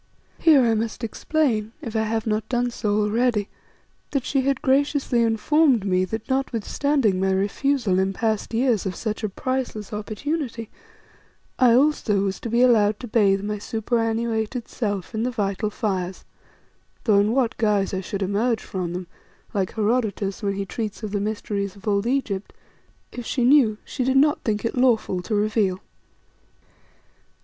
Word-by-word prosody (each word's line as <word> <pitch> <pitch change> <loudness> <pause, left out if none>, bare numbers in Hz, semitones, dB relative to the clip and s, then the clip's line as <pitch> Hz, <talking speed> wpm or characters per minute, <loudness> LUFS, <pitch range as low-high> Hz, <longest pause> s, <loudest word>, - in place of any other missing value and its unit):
Here 300 -5 +6
I 230 -1 +3
must 225 +2 -2
explain, 230 -2 0
if 230 -1 -7
I 220 - +2
have 220 0 -1
not 215 -1 -1
done 245 -1 0
so 210 -2 0
already, 210 0 +1 0.6
that 275 -3 -2
she 275 - +1
had 275 0 0
graciously 270 -2 +2
informed 235 +1 +3
me 185 -1 +2
that 220 +4 -5
notwithstanding 265 -3 0
my 190 0 +1
refusal 200 +2 +1
in 190 0 +1
past 220 +1 -1
years 230 -4 +1
of 185 - -4
such 215 +2 -4
a 215 - 0
priceless 240 -1 -3
opportunity, 230 +3 -4 0.9
I 245 -2 +6
also 250 -7 +2
was 195 -1 -2
to 230 - -5
be 235 +2 +3
allowed 215 -4 +4
to 245 - -6
bathe 200 -3 +3
my 210 0 -3
superannuated 225 +1 -1
self 205 -3 -3
in 220 - -2
the 245 - 0
vital 205 -3 -1
fires, 190 -4 -3 0.8
though 210 -4 +4
in 205 +2 +2
what 240 -3 +1
guise 210 -3 +1
I 190 - -1
should 195 +1 -4
emerge 220 +5 0
from 180 -3 -4
them, 180 0 -5 0.5
like 195 -3 -1
Herodotus 215 -3 0
when 200 -2 -1
he 200 0 -3
treats 215 +1 -5
of 210 - -4
the 205 -1 -1
mysteries 205 -2 -3
of 200 +2 -13
old 200 +1 +1
Egypt, 225 -7 -2 0.6
if 245 - -6
she 255 - 0
knew, 245 -5 +5
she 260 - -3
did 265 +1 +2
not 295 +2 +4
think 215 0 -1
it 230 - -1
lawful 235 -7 +2
to 215 +4 -2
reveal. 205 -3 +1
220 Hz, 165 wpm, -23 LUFS, 200-245 Hz, 0.9 s, Here